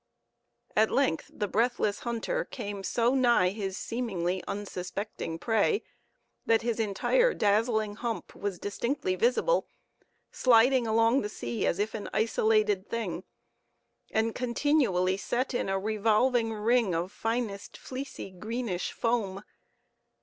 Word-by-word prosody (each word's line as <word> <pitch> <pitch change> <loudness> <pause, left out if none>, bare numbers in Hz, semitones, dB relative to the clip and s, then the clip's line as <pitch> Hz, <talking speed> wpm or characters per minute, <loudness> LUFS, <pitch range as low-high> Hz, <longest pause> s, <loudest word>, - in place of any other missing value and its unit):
At 215 +1 +4
length 270 -12 +1
the 205 - -3
breathless 215 0 +1
hunter 240 - -2
came 205 -5 -6
so 235 +5 +1
nigh 240 -8 +4
his 195 -1 -4
seemingly 190 -7 -2
unsuspecting 190 -3 -5
prey, 225 - +1 0.6
that 225 0 +2
his 235 -1 -1
entire 485 - +2
dazzling 215 0 +1
hump 235 -2 -4
was 200 -3 -3
distinctly 235 +2 -2
visible, 250 - +2 0.6
sliding 245 0 +4
along 225 +4 +3
the 210 - -3
sea 120 - -3
as - - +1
if 210 +2 -1
an 210 - -5
isolated 215 -2 +2
thing, 190 -6 -3 0.8
and 220 +1 0
continually 235 -8 +1
set 250 +6 -2
in 240 - -1
a 195 - +1
revolving 220 +3 +2
ring 220 -3 +2
of 175 +3 -2
finest, 225 -3 -3
fleecy, 260 -6 -7
greenish 215 0 -3
foam. 210 -5 -1
220 Hz, 120 wpm, -29 LUFS, 200-240 Hz, 0.8 s, At